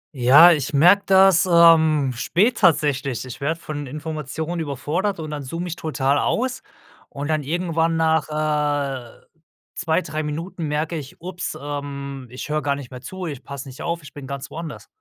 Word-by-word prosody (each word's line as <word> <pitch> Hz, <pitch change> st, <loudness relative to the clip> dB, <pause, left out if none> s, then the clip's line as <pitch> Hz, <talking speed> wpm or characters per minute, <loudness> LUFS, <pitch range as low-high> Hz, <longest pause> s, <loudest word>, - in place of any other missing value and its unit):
Ja, 135 Hz, +8 st, +8 dB
ich 150 Hz, -3 st, 0 dB
merke 180 Hz, +8 st, +6 dB
das, 190 Hz, -2 st, +5 dB
ähm, 160 Hz, -5 st, +5 dB
spät 210 Hz, -, +1 dB
tatsächlich, 140 Hz, -, +2 dB
ich 130 Hz, 0 st, -9 dB
werde 160 Hz, +4 st, -1 dB
von 145 Hz, -3 st, -6 dB
Informationen 155 Hz, +3 st, -5 dB
überfordert 160 Hz, +6 st, -2 dB
und 155 Hz, -1 st, -5 dB
dann 150 Hz, -1 st, -4 dB
zoome 165 Hz, +6 st, -5 dB
ich 170 Hz, -, -4 dB
total 145 Hz, -3 st, 0 dB
aus 255 Hz, +2 st, -1 dB, 0.5 s
und 145 Hz, +2 st, -5 dB
dann 155 Hz, -1 st, +1 dB
irgendwann 165 Hz, +2 st, 0 dB
nach 160 Hz, -1 st, +2 dB
äh, 145 Hz, -5 st, -2 dB, 0.5 s
2, 165 Hz, 0 st, 0 dB
3 155 Hz, +1 st, -4 dB
Minuten 160 Hz, +2 st, -4 dB
merke 155 Hz, +3 st, -2 dB
ich: 145 Hz, -3 st, -9 dB
„Upps, 180 Hz, +1 st, -5 dB
ähm, 140 Hz, -2 st, -6 dB
ich 125 Hz, +2 st, -7 dB
höre 155 Hz, 0 st, -1 dB
gar 140 Hz, 0 st, 0 dB
nicht 140 Hz, -3 st, -9 dB
mehr 125 Hz, -1 st, -9 dB
zu 185 Hz, +7 st, -7 dB
ich 145 Hz, -6 st, -6 dB
passe 140 Hz, -1 st, -8 dB
nicht 130 Hz, -, -10 dB
auf, 170 Hz, -1 st, -3 dB
ich 140 Hz, -, -13 dB
bin 140 Hz, -2 st, -9 dB
ganz 140 Hz, 0 st, -6 dB
woanders.“ 165 Hz, -1 st, -7 dB
150 Hz, 175 wpm, -22 LUFS, 140-165 Hz, 0.5 s, Ja